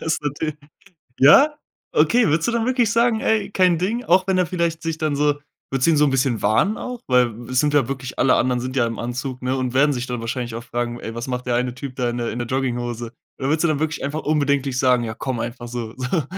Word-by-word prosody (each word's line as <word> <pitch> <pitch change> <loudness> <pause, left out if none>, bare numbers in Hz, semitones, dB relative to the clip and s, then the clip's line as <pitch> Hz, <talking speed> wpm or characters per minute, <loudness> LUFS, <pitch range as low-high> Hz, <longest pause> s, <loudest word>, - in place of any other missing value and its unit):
Das 160 - 0
ist - - -6
natürlich 150 +1 -3 0.6
Ja? 275 - +7 0.4
Okay, 240 -4 +3
würdest 160 +2 +1
du 235 - +1
dann 230 -1 0
wirklich 245 -4 +2
sagen: 230 -1 +2
„Ey, 220 -2 +1
kein 180 -3 +3
Ding." 225 +7 -1
Auch 185 +2 +3
wenn 190 -1 +2
er 180 - +3
vielleicht 170 -1 -2
sich 165 -1 -2
dann 155 -3 -1
so 145 0 +2 0.4
würdest 135 +2 +1
du - - +5
ihn 155 - +3
so 150 - +5
'n 140 - +1
bisschen 130 -3 +1
warnen 200 - +2
auch? 250 -1 -6
Weil, 125 -2 +4 0.2
es 130 0 +1
sind 150 -1 +2
ja 135 -5 +3
wirklich 130 -2 -5
alle 130 - +4
anderen 125 0 +1
sind 130 +1 -5
ja 120 -3 +3
im 115 - -5
Anzug, 125 +2 -4
ne? 130 +1 -1
Und 130 -1 -2
werden 145 +2 +4
sich 125 0 -3
dann 120 -2 -4
wahrscheinlich 120 0 -4
auch 115 - -6
fragen: 120 0 -3
„Ey, 115 +1 -7
was 120 +2 -5
macht 125 0 -3
der 120 - +1
eine 125 0 0
Typ 130 0 -7
da 125 -2 0
in 120 - -3
der 120 -1 -2
in 120 - -5
der 120 - -3
Jogginghose?" 120 -2 -2 0.3
Da 135 - -5
würdest 155 +3 +1
du - - +4
dann 150 -2 0
wirklich 160 0 -2
einfach 150 +3 -3
unbedenklich 140 -3 0
sagen: 125 -2 +3
„Ja, 110 -1 -4
komm 130 -3 -3
einfach 120 +1 -5
so. 115 -2 -5
So, 130 +5 -1
135 Hz, 265 wpm, -21 LUFS, 125-160 Hz, 0.6 s, Ja